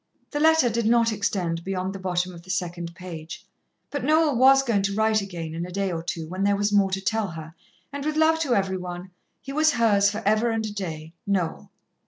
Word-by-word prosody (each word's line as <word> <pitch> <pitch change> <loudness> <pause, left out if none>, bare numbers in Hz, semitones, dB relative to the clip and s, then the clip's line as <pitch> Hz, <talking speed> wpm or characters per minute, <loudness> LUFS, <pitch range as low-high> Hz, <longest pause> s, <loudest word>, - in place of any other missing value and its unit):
The 295 - -2
letter 320 -3 +5
did 230 -1 0
not 230 0 +4
extend 180 -5 -2
beyond 190 0 -3
the 195 - -7
bottom 180 -1 -1
of 170 - -11
the 185 - -18
second 175 -2 -3
page, 170 -3 -8 0.5
but 285 - -3
Noel 310 0 +3
was 270 +2 +6
going 230 -6 +1
to 200 0 -1
write 220 0 +2
again 170 -5 -6
in 165 +1 -4
a 180 - -6
day 195 0 -1
or 165 -1 -3
two, 165 -1 -4
when 185 +3 -3
there 200 0 +3
was 205 +1 0
more 200 -1 +4
to 190 0 -2
tell 220 +1 0
her, 160 -2 -8 0.4
and 285 0 -4
with 305 +1 -1
love 320 +1 +4
to 275 -7 +1
every 190 -1 0
one, 180 0 -7 0.3
he 275 - -7
was 310 +2 +3
hers 205 -4 +4
for 215 +2 -5
ever 215 +3 +3
and 225 -1 -1
a 210 - -5
day, 160 -5 -6
Noel. 185 -5 -1
200 Hz, 230 wpm, -25 LUFS, 180-230 Hz, 0.5 s, was